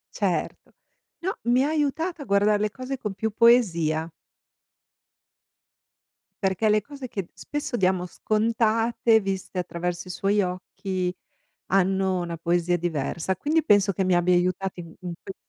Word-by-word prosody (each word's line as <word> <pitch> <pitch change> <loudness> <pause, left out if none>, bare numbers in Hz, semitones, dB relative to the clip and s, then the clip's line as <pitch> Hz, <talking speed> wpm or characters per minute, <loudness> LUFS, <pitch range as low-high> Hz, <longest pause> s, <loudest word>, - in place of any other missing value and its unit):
Certo. - - -2 0.5
No, 380 +3 -1
mi 245 +2 +3
ha - - +1
aiutata 315 +2 -1
a - - -6
guardare 205 0 +3
le 210 0 +1
cose 255 +4 -5
con 210 -5 -4
più 220 +3 -2
poesia 170 -9 +3 2.3
perché 195 +3 +2
le 215 0 +4
cose 280 +4 -9
che 195 -6 -5
spesso 295 -4 -4
diamo 185 -3 +1
scontate, 225 +3 +2
viste 195 -1 -4
attraverso 175 0 -3
i - - -9
suoi 200 +3 +1
occhi 185 0 -3 0.6
hanno 190 0 +2
una 170 -1 -4
poesia 175 +1 +1
diversa. 170 +2 -2
Quindi 310 - +1
penso 205 -3 +4
che 190 +1 -1
mi 185 -1 +3
abbia 175 +1 +3
aiutati 180 +1 0
in 165 -1 -10
in 180 -2 -5
quel 195 - -8
195 Hz, 145 wpm, -25 LUFS, 180-230 Hz, 2.3 s, le